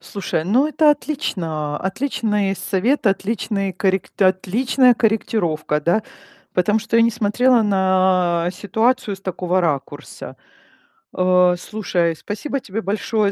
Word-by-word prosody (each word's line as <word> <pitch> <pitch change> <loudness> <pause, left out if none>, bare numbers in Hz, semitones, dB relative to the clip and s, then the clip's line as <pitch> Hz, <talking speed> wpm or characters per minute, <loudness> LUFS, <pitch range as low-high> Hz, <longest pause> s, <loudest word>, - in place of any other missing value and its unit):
Слушай, 180 -5 -4
ну, 255 - +2
это 310 -1 +4
отлично. 165 - -3
Отличный 210 -2 -1
совет, 215 +8 -1
отличный 195 -1 -2
коррек 190 +1 -1
отличная 235 +7 +3
корректировка, 175 -10 0
да. 175 +8 +1 0.5
Потому 210 +4 +2
что 230 +1 -1
я 230 - +5
не 230 - +3
смотрела 240 +2 +2
на 185 -3 +2
ситуацию 215 +3 0
с - - -19
такого 185 -1 -1
ракурса. 145 -2 -4 0.8
Э, 180 -1 +4
слушай, 175 -4 -1
спасибо 245 - -4
тебе 220 -1 -5
большое 205 +1 -1
195 Hz, 115 wpm, -20 LUFS, 180-225 Hz, 0.8 s, я